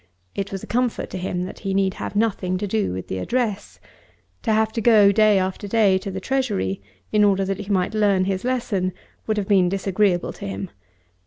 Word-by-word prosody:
It 200 Hz, 0 st, -4 dB
was 195 Hz, -1 st, -5 dB
a -, -, -5 dB
comfort 245 Hz, 0 st, -1 dB
to -, -, -4 dB
him 180 Hz, -1 st, -2 dB
that 185 Hz, -, -7 dB
he 195 Hz, -1 st, -2 dB
need 195 Hz, -1 st, +2 dB
have -, -, -6 dB
nothing 200 Hz, -4 st, 0 dB
to 205 Hz, -, -3 dB
do 210 Hz, -, 0 dB
with 95 Hz, 0 st, -5 dB
the 95 Hz, -, -3 dB
address. 230 Hz, -, -2 dB, 0.6 s
To -, -, 0 dB
have 220 Hz, 0 st, +2 dB
to 225 Hz, -, -3 dB
go, 210 Hz, -3 st, +6 dB
day 215 Hz, 0 st, +4 dB
after 190 Hz, +2 st, -2 dB
day, 200 Hz, -3 st, +3 dB
to 195 Hz, -, -6 dB
the 190 Hz, 0 st, -4 dB
Treasury 100 Hz, -, -1 dB, 0.3 s
in 210 Hz, -1 st, +4 dB
order 195 Hz, -1 st, +3 dB
that 195 Hz, 0 st, -2 dB
he 205 Hz, -1 st, -7 dB
might 185 Hz, +1 st, +1 dB
learn 200 Hz, -3 st, +2 dB
his 190 Hz, 0 st, -2 dB
lesson, 220 Hz, -8 st, -1 dB, 0.3 s
would 215 Hz, -1 st, 0 dB
have 200 Hz, -2 st, -1 dB
been 190 Hz, -4 st, +4 dB
disagreeable 195 Hz, -1 st, 0 dB
to -, -, -7 dB
him. 95 Hz, 0 st, -5 dB
195 Hz, 215 wpm, -22 LUFS, 185-215 Hz, 0.6 s, go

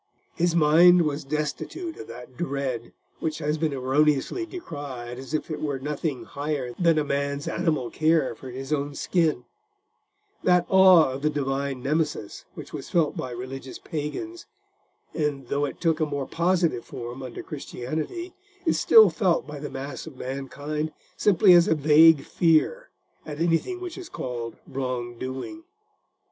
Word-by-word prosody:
His 175 Hz, -1 st, +1 dB
mind 170 Hz, +3 st, +6 dB
was 150 Hz, -1 st, -2 dB
destitute 155 Hz, -, -3 dB
of -, -, -9 dB
that 125 Hz, +2 st, -10 dB
dread 135 Hz, -6 st, -3 dB, 0.3 s
which 155 Hz, -1 st, -2 dB
has 150 Hz, 0 st, -1 dB
been 160 Hz, -1 st, +1 dB
erroneously 145 Hz, -, +1 dB
decried 140 Hz, -, -7 dB
as 135 Hz, +3 st, -4 dB
if 155 Hz, -, -3 dB
it 155 Hz, -, -4 dB
were 145 Hz, -3 st, -1 dB
nothing 145 Hz, 0 st, -3 dB
higher 140 Hz, -4 st, -3 dB
than 170 Hz, -3 st, +4 dB
a 155 Hz, -, +2 dB
man's 140 Hz, 0 st, -2 dB
animal 160 Hz, -8 st, -1 dB
care 155 Hz, -4 st, +2 dB
for 130 Hz, +3 st, -10 dB
his 135 Hz, +3 st, -4 dB
own 145 Hz, -1 st, -2 dB
skin: 155 Hz, -9 st, 0 dB, 1.0 s
that 180 Hz, -1 st, +4 dB
awe 185 Hz, -6 st, +7 dB
of 130 Hz, +1 st, -5 dB
the 155 Hz, -, +2 dB
Divine 135 Hz, -2 st, -2 dB
Nemesis 150 Hz, -6 st, -2 dB
which -, -, -9 dB
was -, -, -6 dB
felt 165 Hz, -4 st, +2 dB
by 130 Hz, -, -4 dB
religious 130 Hz, +2 st, -7 dB
pagans, 330 Hz, -, -5 dB, 0.7 s
and, 145 Hz, -5 st, -2 dB
though 145 Hz, +1 st, +1 dB
it -, -, -6 dB
took 165 Hz, -2 st, +1 dB
a 155 Hz, -, +2 dB
more 145 Hz, -2 st, -3 dB
positive 170 Hz, -7 st, +1 dB
form 120 Hz, +2 st, -7 dB
under 130 Hz, -2 st, -7 dB
Christianity, 155 Hz, -, -5 dB, 0.3 s
is 325 Hz, -, +2 dB
still 445 Hz, -1 st, +7 dB
felt 185 Hz, -5 st, +1 dB
by 150 Hz, -1 st, -8 dB
the 150 Hz, -, -5 dB
mass 135 Hz, +2 st, -6 dB
of 145 Hz, -5 st, -10 dB
mankind 145 Hz, +4 st, -4 dB, 0.2 s
simply 195 Hz, -2 st, +5 dB
as 175 Hz, -1 st, +6 dB
a 160 Hz, -, +3 dB
vague 155 Hz, 0 st, +6 dB
fear 170 Hz, -, +2 dB, 0.3 s
at 150 Hz, -1 st, -7 dB
anything 170 Hz, -, +1 dB
which 365 Hz, 0 st, -6 dB
is 360 Hz, -, -9 dB
called 120 Hz, -2 st, -5 dB
wrong 125 Hz, -3 st, -4 dB
doing. 130 Hz, -, -6 dB
150 Hz, 155 wpm, -25 LUFS, 135-165 Hz, 1.0 s, awe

